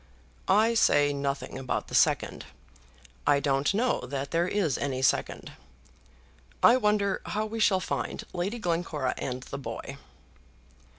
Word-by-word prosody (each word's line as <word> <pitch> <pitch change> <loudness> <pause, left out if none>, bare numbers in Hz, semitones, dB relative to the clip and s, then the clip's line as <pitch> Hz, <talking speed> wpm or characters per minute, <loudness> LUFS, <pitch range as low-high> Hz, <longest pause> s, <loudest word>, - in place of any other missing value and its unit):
"I 215 +4 +4
say 145 -10 +4
nothing 140 -1 -3
about 130 -1 -3
the - - -12
second. - - +2 0.8
I 140 - +5
don't 140 0 +1
know 235 +5 +1
that 140 +1 -4
there 170 +1 +1
is 185 -9 0
any 130 -2 -2
second. - - 0 1.1
I 240 - +8
wonder 210 -4 +1
how 215 +1 -1
we 225 +1 -5
shall 195 -3 +4
find - - -3
Lady 190 +6 -2
Glencora 165 - -1
and 125 0 -4
the 140 - -7
boy." 135 +2 -7
165 Hz, 135 wpm, -28 LUFS, 140-210 Hz, 1.1 s, I